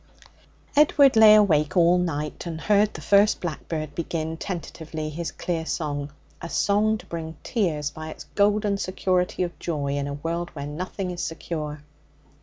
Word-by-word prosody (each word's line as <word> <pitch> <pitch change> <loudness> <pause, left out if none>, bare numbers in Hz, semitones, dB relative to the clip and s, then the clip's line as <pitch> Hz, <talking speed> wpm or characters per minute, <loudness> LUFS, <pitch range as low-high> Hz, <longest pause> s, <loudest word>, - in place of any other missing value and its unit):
Edward 285 -3 +5
lay 220 -1 +9
awake 160 -7 +3
all 175 +1 +5
night, 150 -2 -3
and 160 -1 -5
heard 210 +3 +3
the - - -9
first 205 +1 +4
blackbird 155 -3 -4
begin, 160 0 -3
tentatively, 160 -3 -5
his 170 +2 -4
clear 170 -2 -3
song 145 -3 -3 0.3
a 170 - -6
song 210 +4 +2
to - - -14
bring 160 -2 -6
tears 155 - -1
by 155 +1 -7
its - - -9
golden 205 0 +2
security 185 -1 0
of 175 - -5
joy 145 -4 -2
in 140 0 -2
a 140 - -4
world 170 +3 -3
where 140 -1 -5
nothing 180 +5 -4
is 175 - -5
secure. 155 -2 -5
170 Hz, 160 wpm, -25 LUFS, 155-195 Hz, 0.3 s, lay